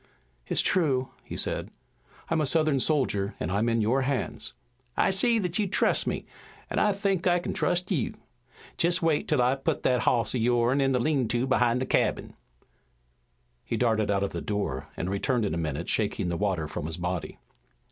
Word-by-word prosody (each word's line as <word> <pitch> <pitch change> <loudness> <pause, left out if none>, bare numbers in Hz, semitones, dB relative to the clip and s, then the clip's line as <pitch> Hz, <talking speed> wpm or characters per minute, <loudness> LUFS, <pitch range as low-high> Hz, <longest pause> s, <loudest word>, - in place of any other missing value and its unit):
"It's - - +1
true," 140 -8 +1
he - - -7
said. - - -2 0.6
"I'm 165 -1 +2
a 150 - +2
Southern 155 -2 +3
soldier, 120 -9 +1
and 80 - -2
I'm 105 +4 +1
in 115 -1 +1
your 120 +6 +2
hands." 135 0 -2 0.4
"I - - +3
see 230 +5 +2
that 180 -2 -1
you 205 - +1
trust - - +1
me, - - -2 0.5
an' - - 0
I 210 - +4
think 195 -2 0
I 175 0 +4
kin 175 - -3
trust 180 +1 0
you. 145 - 0 0.6
Jest 175 +1 +2
you - - +2
wait 150 - 0
'til 145 -5 +2
I 125 +2 +3
put 135 - -2
that 125 -1 +3
hoss 115 -1 +2
o' 125 - 0
yourn 120 +3 +2
in 135 0 +2
the 125 - +2
lean 135 -2 +1
to 120 +3 0
behind 125 -2 +2
the 130 - -1
cabin." - - 0 1.3
He - - -3
darted 110 -4 +1
out 100 -1 +1
of 100 - -2
the - - -4
door 105 -1 -3
and 85 - -2
returned 110 +5 0
in 100 - -1
a - - -1
minute 80 0 -3
shaking 100 -4 0
the 85 - -1
water 95 -6 -1
from 75 - -5
his 80 +1 -3
body. 90 -1 -3
125 Hz, 200 wpm, -27 LUFS, 105-155 Hz, 1.3 s, I